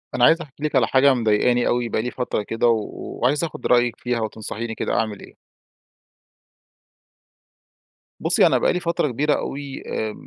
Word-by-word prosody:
أنا 120 - +4
عايز 165 +1 +4
أحكي 145 -2 -11
لِك 150 -2 -1
على 130 - +4
حاجة 135 +1 +4
مضايقاني 120 +1 +2
أوي 120 -1 0
بقى 110 - 0
لي 125 +2 -4
فترة 125 -4 -2
كده، 115 +3 0
و 110 -3 +1 0.3
وعايز 145 +6 +2
آخد 165 - -4
رأيك 120 -1 +3
فيها 125 -1 -2
وتنصحيني 110 +1 -5
كده - - -2
أعمل 110 -2 -1
إيه. - - -14 2.9
بُصّي، - - +3
أنا - - +3
بقى - - +2
لي 180 - -1
فترة 170 -3 0
كبيرة 145 +4 0
أوي 140 -1 -5
آآ، 110 -1 -3
125 Hz, 170 wpm, -22 LUFS, 115-140 Hz, 2.9 s, أنا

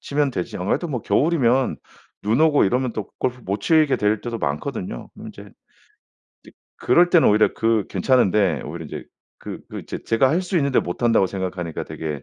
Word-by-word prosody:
치면 145 -1 0
되지. 90 -8 -4
아무래도 100 - -1
뭐 125 -7 -3
겨울이면 130 +1 +2 0.5
눈 110 +7 +1
오고 155 -6 +4
이러면 125 +4 0
또 105 -3 -5
골프 125 -1 -2
못 100 +2 -3
치게 155 +1 +3
될 105 0 0
때도 120 -1 -4
많거든요. 75 - -4
그럼 - - -10
이제 - - -12 1.3
그럴 175 +8 +3
때는 170 -3 +5
오히려 105 +1 +3
그 110 -3 +1
괜찮은데 100 - +2
오히려 80 +2 -7
이제 - - -7 0.4
그 - - -7
그 - - -6
제 - - -5
제가 115 +4 +3
할 175 +5 +1
수 180 0 -1
있는데 140 -3 +1
못한다고 105 +2 +1
생각하니까 90 -3 -4
되게 75 -4 -6
115 Hz, 365 characters per minute, -22 LUFS, 95-140 Hz, 1.3 s, 때는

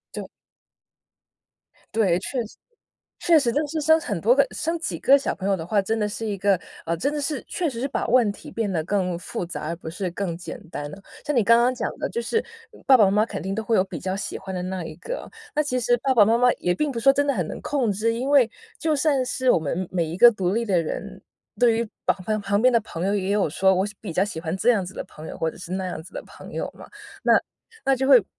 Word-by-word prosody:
对。 - - -5 1.7
对， 195 -6 +3
确 245 +5 -3
实 220 - -13 0.6
确 335 -2 +4
实 245 -4 +1
就 285 - +1
是 310 +2 -3
生 315 +2 +5
很 205 - -3
多 240 +8 +4
个 280 0 +5
生 330 +2 -2
几 330 - -4
个 275 +1 +6
小 275 - -2
朋 195 +1 -4
友 195 - +2
的 165 -2 -6
话， 200 +2 +2
真 220 +3 -1
的 210 - 0
是 220 +2 -5
一 205 -2 -2
个 195 -1 +3 0.3
呃， 165 0 0
真 280 - -1
的 300 - -2
是 290 0 -3
确 350 -3 -1
实 235 -5 -5
是 270 - -1
把 - - -2
问 240 -3 +4
题 200 - -10
变 215 -4 -1
得 160 -3 -1
更 185 -3 -1
复 180 - -5
杂， 170 - -6
而 165 - -2
不 165 -1 -8
是 180 +3 -3
更 180 -3 -3
简 175 - -7
单 145 - -5
的 150 - -9
了。 195 - -15 0.2
像 295 - -1
你 240 - +4
刚 230 +3 +6
刚 245 +2 +3
讲 - - -2
的， - - -2
就 470 - -2
是 450 - 0 0.4
爸 265 -2 +8
爸 215 - +6
妈 195 - +3
妈 210 +2 +3
肯 - - -5
定 190 - -3
都 220 +3 -3
会 225 - +1
有 185 - +5
比 190 - -7
较 185 0 -3
喜 195 - -4
欢 190 0 -7
的 180 - -3
那 185 -2 -4
一 155 - -7
个， - - -6 0.3
那 300 - +4
其 255 -3 -1
实 245 +1 +3
爸 265 -1 +3
爸 215 -4 +7
妈 225 +3 +3
妈 250 0 +5
也 180 - +1
并 300 +7 -1
不 230 - -3
是 - - -9
说 275 +3 +7
真 285 +1 +1
的 280 - +2
很 180 - 0
能 - - -6
控 265 -6 0
制， 220 +3 0
因 250 +4 -2
为 270 -5 +6 0.3
就 315 -1 +1
算 280 -3 +2
是 255 0 +1
我 - - +5
们 165 +4 -3
每 175 -2 0
一 160 +1 -5
个 240 +5 +9
独 190 -5 -1
立 230 +3 0
的 190 -6 +2
人， 160 - -5 0.4
对 235 -2 +4
于 230 -1 -1 0.2
旁 215 +3 0
旁 200 +2 0
边 255 0 +5
的 235 - +5
朋 170 -3 -5
友 195 - +1
也 195 -1 -1
有 200 -6 +2
说， 190 +4 +3
我 190 +1 +1
喜 210 - -5
比 200 -7 -6
较 185 +4 +2
喜 205 -6 -6
欢 165 +2 -3
这 225 +5 +3
样 200 -6 +1
子 190 - -9
的 - - -4
朋 155 -3 -12
友， - - -7
或 160 - -1
者 - - -15
是 180 0 -8
那 190 0 -2
样 180 - -5
子 170 +4 -14
的 - - -5
朋 - - -13
友 - - -3
嘛。 - - -11 0.4
那 - - +5 0.5
那 270 -1 +3
就 265 - 0
会 255 -7 +7
210 Hz, 300 characters per minute, -24 LUFS, 185-255 Hz, 1.7 s, 个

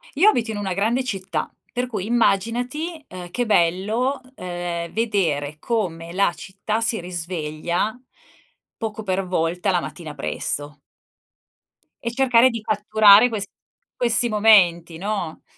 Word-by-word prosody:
Io 350 +9 +5
abito 240 - +3
in 215 - -4
una 195 -2 -2
grande 225 +7 +1
città. 195 -6 -3 0.2
Per 250 +1 -2
cui 210 -6 -4
immaginati, 240 - 0
ehm, 180 -1 -9
che 245 +4 -1
bello, 215 +8 +1 0.2
ehm, 175 -3 -4
vedere 170 -11 0
come 170 -8 -2
la 185 -1 +2
città 205 +5 -4
si 230 0 +1
risveglia 175 +3 -3 0.8
poco 220 -1 -5
per 190 -1 -1
volta 180 +2 0
la 180 - +2
mattina 165 -3 -7
presto. 145 0 -3 1.2
E 235 - -2
cercare 250 0 +4
di 230 -2 -5
catturare 215 +1 +5
ques 215 -4 -3 0.5
questi 240 0 +2
momenti, 185 -7 +4
no. 195 -3 -4
200 Hz, 125 wpm, -22 LUFS, 175-230 Hz, 1.2 s, Io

